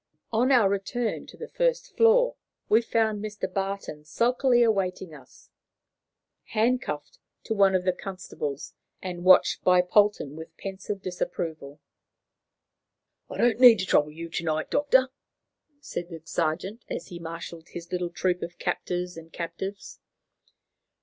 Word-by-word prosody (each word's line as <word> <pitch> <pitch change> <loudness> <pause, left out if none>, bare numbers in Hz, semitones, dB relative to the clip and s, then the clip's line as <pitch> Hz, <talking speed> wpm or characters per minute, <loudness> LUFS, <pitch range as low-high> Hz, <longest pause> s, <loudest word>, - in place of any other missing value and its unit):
On 245 +4 +3
our 240 -6 +6
return 200 +4 -2
to - - -13
the 470 - -7
first - - -1
floor, - - +5 0.3
we 220 +2 +5
found 220 -2 0
Mr. 210 0 -7
Barton 195 -5 -4
sulkily 240 - +2
awaiting 190 -6 0
us, 135 -4 -16 0.9
handcuffed 220 - -1 0.2
to 225 - -2
one 195 -2 +4
of 180 - +1
the 185 0 +2
constables, 175 -7 -6 0.3
and 175 -2 -5
watched 185 0 +5
by 180 -1 +5
Polton 200 -6 +2
with 160 +1 -10
pensive 195 0 -6
disapproval. 160 -5 -4 1.5
"I 240 -1 +2
needn't 225 -5 +7
trouble 150 -2 +3
you 165 +2 -7
to 170 - -3
night, 155 -1 -1
Doctor," 265 -3 +3 0.7
said 175 -10 -5
the 165 -2 -9
sergeant, 175 +8 -2
as - - -5
he 175 - -8
marshalled 165 0 -8
his 170 0 -9
little 180 -1 -1
troop 180 +1 -1
of 175 +1 -6
captors 180 -1 -3
and 165 0 -11
captives. 175 +4 -6
185 Hz, 135 wpm, -26 LUFS, 170-220 Hz, 1.5 s, needn't